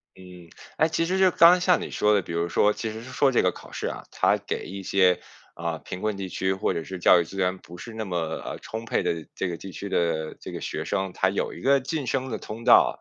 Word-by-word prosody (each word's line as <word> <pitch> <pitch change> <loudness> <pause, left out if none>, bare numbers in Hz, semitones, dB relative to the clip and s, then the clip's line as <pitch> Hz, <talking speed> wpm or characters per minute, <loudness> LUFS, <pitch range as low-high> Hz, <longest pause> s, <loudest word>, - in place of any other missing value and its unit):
嗯， 90 -2 -13 0.3
诶， 160 - +4
其 165 +1 0
实 185 +3 0
就 190 -1 +5
刚 170 +1 +8
刚 180 +1 +5
像 180 -1 +3
你 - - -5
说 105 0 +2
的， 100 - +3
比 85 - -9
如 85 +1 0
说 105 +4 +3
其 110 +1 -4
实 110 +1 -7
是 130 - -10
说 135 +1 +3
这 120 - +3
个 90 - +2
考 - - -13
试 - - -3
啊， - - -5
它 - - +2
给 - - -5
一 100 +1 -7
些， 90 -2 +3 0.4
呃， 85 -1 -3
贫 90 - -8
困 110 -1 -1
地 95 -1 -5
区 95 +1 0
或 95 - -1
者 80 - -3
是 95 +2 -7
教 85 - +6
育 85 - +2
资 90 - -11
源 95 0 +1
不 90 -1 -13
是 115 +3 -9
那 110 - -3
么， 90 -3 -4 0.3
呃， - - -5
充 115 +1 -6
沛 - - 0
的 80 -2 -2
这 95 - -2
个 85 -2 -4
地 95 - -9
区 100 +2 -6
的 80 -3 0
这 - - -8
个 - - -6
学 - - -4
生， 95 -2 -2
他 95 - +2
有 - - -2
一 - - -10
个 140 +1 +4
晋 140 +2 -3
升 130 +1 -1
的 115 - -3
通 110 +2 -8
道， - - +5
95 Hz, 300 characters per minute, -25 LUFS, 90-120 Hz, 0.4 s, 刚